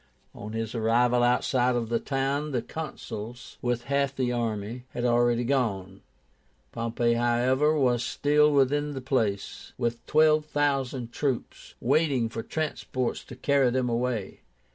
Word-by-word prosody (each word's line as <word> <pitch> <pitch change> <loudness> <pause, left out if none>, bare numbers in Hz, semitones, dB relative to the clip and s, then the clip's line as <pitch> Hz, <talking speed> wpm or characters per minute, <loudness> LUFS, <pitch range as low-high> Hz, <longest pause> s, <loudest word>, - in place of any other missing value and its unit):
On 105 +1 -8
his 115 0 -3
arrival 120 +2 +2
outside 125 +1 +2
of 115 -2 -2
the 115 0 +1
town, 140 +2 -1
the 120 - 0
Consuls, 125 -6 -7
with 120 -1 -1
half 140 +1 0
the 130 -2 0
army, 115 0 -3
had 120 - -1
already 120 0 +3
gone. 100 -8 -1 0.7
Pompey, 115 +1 0
however, 125 +6 +2
was 125 -4 +2
still 150 +3 +3
within 145 +1 +2
the 135 - -4
place, 115 -7 -2
with 120 -1 -2
twelve 155 0 +4
thousand 135 -5 -1
troops, 135 -2 -3
waiting 135 -3 +2
for 115 - -5
transports 130 -4 -3
to 125 - -10
carry 140 0 +2
them 125 0 0
away. 115 -3 -2
125 Hz, 140 wpm, -27 LUFS, 120-140 Hz, 0.7 s, twelve